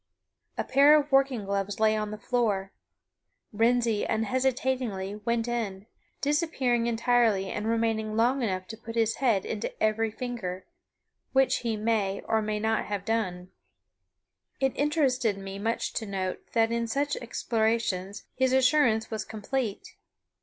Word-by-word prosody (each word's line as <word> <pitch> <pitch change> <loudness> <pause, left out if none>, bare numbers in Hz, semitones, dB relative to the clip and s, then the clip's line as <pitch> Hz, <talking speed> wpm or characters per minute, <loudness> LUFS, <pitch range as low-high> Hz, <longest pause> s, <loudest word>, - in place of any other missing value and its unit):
A - - 0
pair 290 +3 +6
of 290 0 -5
working 270 -5 +3
gloves 200 +1 -2
lay 220 0 +4
upon 215 -1 -2
the 215 - -6
floor. 210 -4 0 0.8
Wrensie 230 0 +2
unhesitatingly 240 -3 -1
went 235 0 0
in, 210 -5 -3 0.4
disappearing 280 -6 +1
entirely 230 -4 +2
and 210 +1 -3
remaining 225 -1 0
long 245 +4 +2
enough 185 -5 -1
to 220 - -7
put 230 +1 -9
his 225 -1 +1
head 230 -8 +2
into 215 0 -3
every 220 +1 +1
finger 215 -6 -5 0.7
which 265 0 +4
he 230 -2 -2
may, 210 -3 0
or 220 0 0
may 210 0 -2
not 220 0 0
have 205 -2 -4
done. 185 -5 -2 1.1
It 270 -1 +1
interested 265 -8 +1
me 195 0 -7
much 225 +3 -2
to 220 - -3
note 190 -2 -4
that 225 -1 +3
in 235 0 -1
such 285 +5 0
explorations 220 -4 -1
his 260 0 +1
assurance 255 -4 +3
was 215 -1 -2
complete. 220 +1 -4
225 Hz, 140 wpm, -28 LUFS, 210-245 Hz, 1.1 s, pair